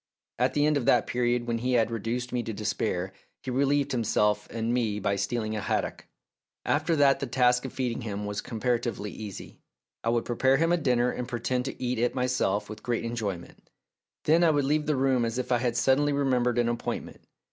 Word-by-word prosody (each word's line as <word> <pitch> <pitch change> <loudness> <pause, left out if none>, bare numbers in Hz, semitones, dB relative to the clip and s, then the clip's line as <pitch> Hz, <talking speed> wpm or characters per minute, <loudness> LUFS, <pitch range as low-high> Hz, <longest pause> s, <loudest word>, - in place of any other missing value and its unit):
At 125 +1 +1
the 145 0 +3
end 150 -1 +3
of 130 - -2
that - - +4
period, 120 0 0
when 115 -1 -1
he 125 +2 -1
had 115 -2 +2
reduced 120 +2 -3
me 125 - +1
to 115 -1 -5
despair, 100 -3 -2 0.3
he 130 - -4
relieved 140 +2 +1
himself 105 -3 +1
and 115 +1 -2
me 110 -4 0
by 100 0 0
stealing 110 +2 -2
a 105 - -2
haddock. - - -2 0.6
After 155 +3 +1
that 140 -2 +4
the 140 - -3
task 125 0 +2
of 130 - -6
feeding 125 -2 -2
him 105 -2 -4
was 105 0 -3
comparatively 115 -3 -2
easy. 105 -3 -9 0.4
I 115 - +1
would 115 0 +1
prepare 130 +3 +2
him 165 +3 +2
a 175 - +4
dinner 125 -5 +2
and 125 - -4
pretend 125 +1 -1
to 135 - -5
eat 125 -2 -1
it 120 +3 +1
myself 125 -5 0
with 105 0 -9
great 120 -1 -2
enjoyment; 105 -7 -5 0.5
then 165 +3 +4
I 170 - +5
would 145 -3 +2
leave 150 +2 +1
the 150 - +2
room 130 -2 +2
as 115 +1 -2
if 125 - -3
I 120 - +3
had 120 -1 -1
suddenly 135 +4 +3
remembered 125 -4 +1
an 120 -1 +2
appointment. 120 0 -4
120 Hz, 210 wpm, -27 LUFS, 115-130 Hz, 0.6 s, I